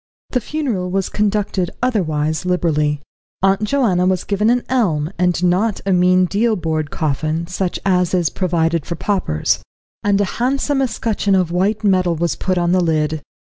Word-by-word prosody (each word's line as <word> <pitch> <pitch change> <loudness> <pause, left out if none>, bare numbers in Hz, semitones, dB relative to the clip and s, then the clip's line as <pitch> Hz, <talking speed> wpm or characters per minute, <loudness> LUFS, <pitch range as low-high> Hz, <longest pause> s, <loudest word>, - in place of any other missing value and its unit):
The 250 - +1
funeral 235 -12 -2
was 190 +1 -1
conducted, 205 -3 0
otherwise, 160 -11 0
liberally. 150 -5 0 0.4
Aunt 195 +2 +3
Joanna 205 -8 +2
was 185 -1 +1
given 210 +2 +1
an 245 +1 +2
elm, 175 -12 0
and 180 -1 +1
not 190 +4 +2
a 195 - +2
mean 180 +1 +4
deal 215 +5 +1
board 160 -4 -2
coffin, 155 +2 -1
such 180 +1 -3
as 180 -2 +2
is 170 -5 +1
provided 165 -3 0
for 170 - -4
paupers; 75 - 0 0.4
and 205 -1 +2
a 205 - +2 0.2
handsome 275 +2 +1
escutcheon 220 -5 0
of 180 -3 +1
white 200 +5 0
metal 185 -4 +2
was 170 0 -1
put 185 -1 -1
on 175 0 +1
the 185 0 +3
lid. 155 -2 0
180 Hz, 165 wpm, -19 LUFS, 165-205 Hz, 0.4 s, mean